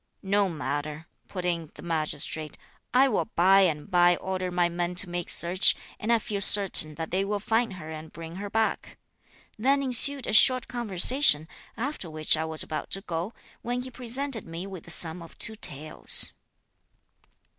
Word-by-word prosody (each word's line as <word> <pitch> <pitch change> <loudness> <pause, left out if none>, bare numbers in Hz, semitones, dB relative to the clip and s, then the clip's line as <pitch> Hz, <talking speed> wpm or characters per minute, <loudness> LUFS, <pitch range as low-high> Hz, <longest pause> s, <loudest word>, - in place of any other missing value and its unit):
'No 200 0 0
matter,' 150 -1 -6 0.2
put 180 -2 -7
in 170 -3 -3
the - - -13
Magistrate, 155 -2 -3 0.3
'I 265 +2 +3
will 220 - -1
by 190 +3 +4
and 160 -4 -1
by 175 0 +3
order 185 0 -5
my 175 -1 0
men 175 +1 -4
to 185 +1 0
make 175 0 -6
search, 180 +3 +2 0.2
and 220 - -3
I 235 - +4
feel 205 -2 -5
certain 190 -7 +6
that 160 0 -7
they 190 +2 -1
will 205 +1 -3
find 225 +1 -1
her 160 -4 -10
and 155 0 -10
bring 165 +1 -10
her 205 +1 -7
back.' 220 +1 -3 0.6
Then 275 +4 +1
ensued 270 +1 +4
a - - -4
short 255 +3 +5
conversation, 230 - +3 0.3
after 240 - -5
which 155 0 +3
I 160 +1 -4
was 160 -1 +2
about 155 - -7
to - - -10
go, 175 +3 -6 0.3
when 245 +1 -4
he 255 - -9
presented 250 -1 -4
me 165 +3 -7
with 190 -4 -10
the - - -14
sum 165 +1 -2
of 165 - -14
two 220 - +1
taels." 155 -6 +3
185 Hz, 175 wpm, -25 LUFS, 165-225 Hz, 0.6 s, certain